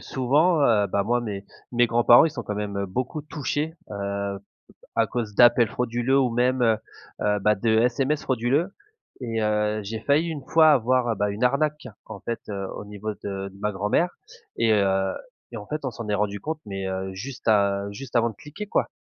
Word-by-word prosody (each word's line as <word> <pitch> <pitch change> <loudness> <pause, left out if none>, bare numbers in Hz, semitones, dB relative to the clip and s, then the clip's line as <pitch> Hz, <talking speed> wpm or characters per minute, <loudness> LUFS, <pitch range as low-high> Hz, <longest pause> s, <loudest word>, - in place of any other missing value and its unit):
souvent 145 +5 +2
heu, 105 -6 +4
bah 100 +1 0
moi 120 +4 +1
mes 105 -4 -5 0.3
mes 120 0 +4
grands-parents 120 +3 +6
ils 165 - +1
sont 120 -5 -6
quand 105 - -4
même 100 -1 -3
beaucoup 130 - -3
touchés, 150 +1 -3 0.2
heu, 100 -1 -3 0.6
à 115 -1 +3
cause 105 -2 -4
d'appels 120 -1 +6
frauduleux 125 +2 0
ou 130 -3 +3
même, 125 +2 +1
heu, 115 -2 +4 0.4
heu, 105 0 +1
bah, 105 +2 +3
de 110 +2 +2
SMS 135 +5 +1
frauduleux. 135 - 0 0.5
Et 115 -3 -2
heu, 105 0 0
j'ai 110 +2 -5
failli 145 +7 +2
une 145 -4 -5
fois 160 -1 +6
avoir, 125 -2 +2
heu, 115 - +1
bah, 105 0 0
une 105 +5 -4
arnaque 145 +2 +1 0.2
en 110 -3 -9
fait, 115 -1 -3
heu, 100 -1 -4
au 105 - -8
niveau 105 +1 -5
de 100 -1 -6
de 95 - -17
ma 105 0 -1
grand-mère 105 - 0 0.4
et 115 - +2
heu 95 -2 +2 0.4
et 120 - -6
en 105 - -8
fait 150 0 -4
on 130 - -2
s'en 115 -2 -7
est 105 - -1
rendu 100 0 -1
compte 155 +8 -4
mais, 95 -2 -4
heu, 95 0 -4
juste 120 +6 -8
a 100 -1 +2
juste 125 +5 -9
avant 115 0 +3
de 110 - -10
cliquer 155 - -8
quoi. - - 0
115 Hz, 205 wpm, -25 LUFS, 100-130 Hz, 0.6 s, grands-parents